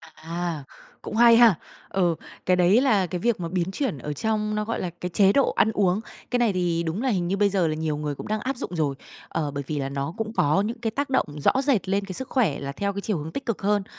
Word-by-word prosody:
À, 165 -1 -4 0.4
cũng - - -6
hay 235 0 +7
ha! 230 -5 +7 0.3
Ừ, 175 -3 +1 0.3
cái 185 - +4
đấy 180 +6 +4
là 210 -9 +3
cái 180 +1 -4
việc 235 +1 +1
mà 170 - -3
biến 180 0 -1
chuyển 255 - -2
ở 150 +3 -5
trong 215 +5 -1
nó 210 0 -1
gọi 230 - -2
là 180 - -2
cái 180 - -2
chế 195 +2 +4
độ 275 - +3
ăn 220 +3 +2
uống. 195 -2 +2 0.3
Cái 245 - +2
này 230 -5 +3
thì 175 -2 0
đúng 170 +6 -2
là 265 - +1
hình 180 -6 0
như 195 +3 0
bây 205 0 +3
giờ 190 -4 +1
là 155 - -1
nhiều 155 -1 -2
người 150 -1 -3
cũng - - -8
đang 215 +1 -1
áp 265 +5 -2
dụng 180 - -5
rồi, 150 -4 0 0.3
ờ, 150 -3 -2
bởi 140 0 -4
vì 150 -2 -2
là 135 -1 -2
nó 140 +3 -3
cũng 225 -1 -3
có 155 -1 +3
những 225 +3 -3
cái 225 -2 -1
tác 280 +5 -2
động 260 - +2
rõ 265 - +3
rệt 255 - +1
lên 200 +1 +1
cái 190 - -6
sức 260 +8 -5
khỏe 215 - +1
là 140 0 -4
theo 200 +8 -2
cái 200 - -4
chiều 205 -2 -1
hướng 155 +1 -6
tích 275 - -5
cực 230 -4 -2
hơn. 205 0 +2
195 Hz, 280 wpm, -25 LUFS, 165-220 Hz, 0.4 s, hay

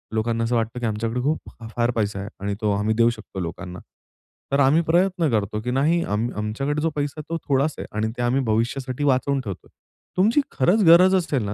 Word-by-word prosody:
लोकांना 115 +1 0
असं 120 +1 0
वाटतं 115 +1 -1
की 120 - -3
आमच्याकडे 115 +3 -2
खूप, 150 +4 -2 0.3
फार 120 0 +1
पैसा 105 -4 -2
आहे 100 +2 -6
आणि 100 0 -1
तो 105 -1 +1
आम्ही 105 +2 +1
देऊ 115 0 +4
शकतो 110 -4 -7
लोकांना. 90 +1 -6 0.7
तर 140 - +2
आम्ही 140 +4 +4
प्रयत्न 175 -1 +2
करतो 105 -1 -1
की 125 +2 -3
नाही 155 +6 +2
आम 110 0 -1
आमच्याकडे 135 +8 -2
जो 165 - +1
पैसा 145 -1 -2
आहे 150 - -5
तो - - 0
थोडाच 140 +3 +2
आहे - - -5
आणि 110 - +1
ते 120 - -2
आम्ही 125 +3 +1
भविष्यासाठी 125 +5 -1
वाचवून 135 0 +2
ठेवतोय. 100 -7 -8 0.5
तुमची 220 +10 +4
खरंच 190 +10 +2
गरज 180 +3 +7
असेल 155 - 0
ना 100 0 -3
125 Hz, 210 wpm, -23 LUFS, 110-150 Hz, 0.7 s, गरज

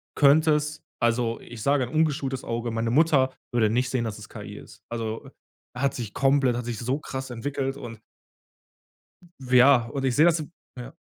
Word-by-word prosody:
könntest 150 +1 +3 0.2
also, 115 0 +1
ich 115 -2 -10
sage 140 -2 +2
'n - - -10
ungeschultes 150 -4 0
Auge 115 0 -3
meine 115 0 -1
Mutter 140 -3 +3 0.2
würde 115 -3 +2
nicht 125 +2 +1
sehen, 125 -3 -1
dass 110 -3 -5
es - - -11
KI - - -9
ist. - - -14
Also, 115 -1 -5 0.5
hat 135 +2 0
sich 115 -4 -5
komplett 135 -3 +2
hat 120 - -4
sich 120 -3 -4
so 130 +5 -1
krass 130 -2 -6
entwickelt 135 +2 -3
und 115 -4 -9 1.4
W 130 -1 -6
ja, 125 -3 +6
und 135 -1 -2
ich 125 - +1
sehe 155 +3 +6
das 165 -2 +3 0.3
ja. 125 +4 -8
130 Hz, 180 wpm, -25 LUFS, 120-140 Hz, 1.4 s, ja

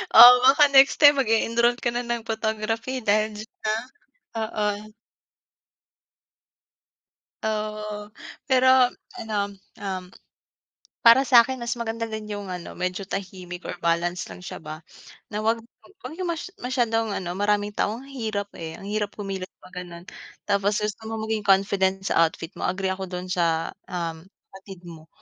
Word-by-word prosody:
Oo, 245 +2 +12
baka 285 +2 +6
next 270 0 +7
time 290 -2 +7
mag-e-enroll 235 +1 +2
ka 240 - -1
na 240 - -1
ng 235 -1 -3
photography 225 +3 -2
dahil 215 0 +1
diyan, 215 +1 -4 0.5
ah, 225 - 0
oo. 210 0 -2 2.5
Oo, 215 -1 -3 0.4
pero 260 -1 +5 0.3
ano, 220 -2 -5 0.4
um, 190 -2 -4 1.0
para 235 +3 +7
sa'kin 255 0 +5
mas 235 -2 -4
maganda 230 0 -3
din 220 -1 -6
yung 205 -2 -5
ano 180 -1 -7
medyo 185 +2 -3
tahimik 180 -2 -6
or 175 - -6
balance 170 0 0
lang 180 - -11
siya - - -7
ba, 155 0 -9 0.5
na 210 - -2
'wag, 225 +2 +2 0.5
wag - - -6
yung 365 - -2
mas 340 +2 -4
masyadong 235 -3 0
ano 175 -2 -4
maraming 205 +2 0
tao 210 +1 -1
ang 255 - -11
hirap, 220 -7 -4
eh, 160 -1 -6
ang - - -12
hirap 205 0 -3
kumilos 195 -2 -5
'pag 180 0 -9
gano'n. 175 -1 -10 0.4
Tapos 205 +1 +1
gusto 210 0 -3
mo 225 - -4
maging 220 0 -1
confident 195 -1 +2
sa 165 -3 +4
outfit 165 +2 -9
mo, - - 0
agree 190 0 -1
ako 190 0 -5
do'n 180 0 -5
sa, 165 -2 0 0.2
um, 165 -2 -4 0.3
kapatid 190 -2 -12
mo. 165 -2 -12
210 Hz, 150 wpm, -24 LUFS, 185-230 Hz, 2.5 s, Oo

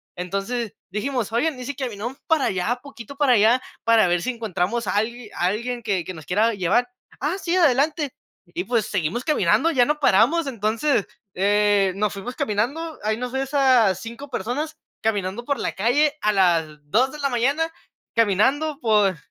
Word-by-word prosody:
entonces 195 +6 -3 0.2
dijimos: 230 +2 -2
"Oye, 240 +8 +2
y 250 - -7
si 285 +2 -4
caminamos 245 -1 -5
para 320 -4 +3
allá 195 +7 -1
poquito, 280 -2 -10
para 280 -3 +4
allá 230 +3 +4 0.2
para 230 -4 +4
ver 175 0 +1
si 255 - -2
encontramos 220 -1 -2
a 185 - -1
alg 225 +2 -2
a 175 - 0
alguien 235 +5 -2
que 195 -5 0
que 185 - -6
nos 155 -3 -11
quiera 215 +5 +2
llevar". 200 +6 +1 0.3
"Ah, 305 +8 -1
sí 350 -2 -1
adelante", 295 -2 +2 0.4
y 350 - -2
pues 235 - 0
seguimos 195 +3 -2
caminando, 300 - +3
ya 255 -6 +4
no 300 +2 0
paramos, 285 - +3
entonces, 230 +1 0 0.3
eh, 205 0 +3
nos 210 +1 0
fuimos 200 +6 -6
caminando, 280 +11 -2
ahí 215 +1 0
nos 250 +1 -5
ves 270 +1 -3
a 255 -8 +5
5 235 +8 -9
personas, 285 +7 -3 0.3
caminando 205 0 -1
por 280 0 -2
la - - -2
calle, 275 +9 +2
a 210 - +3
las 175 -5 +3 0.2
2 250 - +3
de 300 - -9
la 285 - +1
mañana, 275 +7 +1 0.5
caminando 260 +8 +2
por 210 - +2
235 Hz, 175 wpm, -23 LUFS, 205-275 Hz, 0.5 s, a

